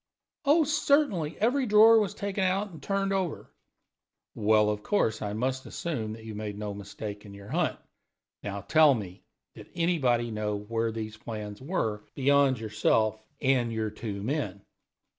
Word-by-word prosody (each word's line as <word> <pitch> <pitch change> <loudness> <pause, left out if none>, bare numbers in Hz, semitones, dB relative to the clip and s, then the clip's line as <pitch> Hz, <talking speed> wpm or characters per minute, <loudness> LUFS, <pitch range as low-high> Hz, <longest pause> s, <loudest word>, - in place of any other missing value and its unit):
"Oh, 305 +4 +5
certainly; 280 - +1
every 250 +4 +2
drawer 220 +2 +7
was 205 -4 -1
taken 200 -1 -2
out 195 +2 0
and 160 - -11
turned 195 0 -1
over." 185 -5 -3 0.8
"Well, 105 0 +3
of 105 0 -4
course 110 - 0
I 105 -1 -3
must 130 +4 -2
assume 115 -10 -4
you 110 -1 -9
made 105 -1 -5
no 105 -1 -4
mistake 100 +1 -7
in 100 -2 -11
your 100 +1 -12
hunt. - - 0 0.6
Now 100 0 -5
tell 155 +1 +5
me, 95 -5 -7 0.3
did - - -13
anybody 130 -9 +1
know 105 -1 -2
where 115 +2 -2
these 110 -1 -6
plans 105 -2 -7
were, 115 - -2
beyond 140 -2 +3
yourself 110 0 +1 0.2
and 130 -4 +2
your 110 -1 -2
two 105 -2 -6
men?" 105 -7 -3
115 Hz, 155 wpm, -28 LUFS, 105-170 Hz, 0.8 s, drawer